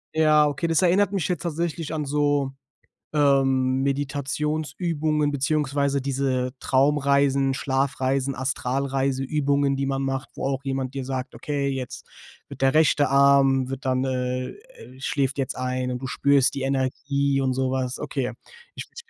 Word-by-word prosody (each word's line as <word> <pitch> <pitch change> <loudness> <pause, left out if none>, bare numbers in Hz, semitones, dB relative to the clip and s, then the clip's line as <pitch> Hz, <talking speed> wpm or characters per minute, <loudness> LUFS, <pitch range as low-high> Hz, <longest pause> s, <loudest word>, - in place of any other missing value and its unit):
Ja, 155 -1 +5
okay, 145 +3 -1
das 165 +1 +2
erinnert 185 +3 +3
mich 195 -5 -1
jetzt 175 -6 -2
tatsächlich 170 -1 -3
an 155 -2 -2
so, 145 -1 +1 0.6
ähm, 135 -3 +3
Meditationsübungen 150 +2 -1
beziehungsweise 140 0 0
diese 130 -1 -1
Traumreisen, 140 0 +2
Schlafreisen, 135 0 0
Astralreise-Übungen 135 +2 0
die 135 0 -1
man 135 0 -1
macht, 135 -1 -3
wo - - -4
auch 135 0 -2
jemand 135 -1 -3
dir 135 -1 -4
sagt: 130 -1 -4
„Okay, 145 -2 -2
jetzt 130 -3 -5 0.4
wird - - -10
der 135 0 +3
rechte 150 -3 +3
Arm 135 -1 +4
wird 135 0 -6
dann, 130 0 0
äh 125 -1 -2 0.5
schläft 140 -3 -1
jetzt 135 -2 -2
ein, 130 0 -2
und 125 - -3
du 130 - -4
spürst 140 0 +3
die 140 - -4
Energie." 135 +1 0
und 130 -1 +1
so 130 0 0
was. 130 -1 -2
Okay. 135 -3 -3 0.4
Ich - - -7
bin - - -25
140 Hz, 150 wpm, -24 LUFS, 130-145 Hz, 0.6 s, Ja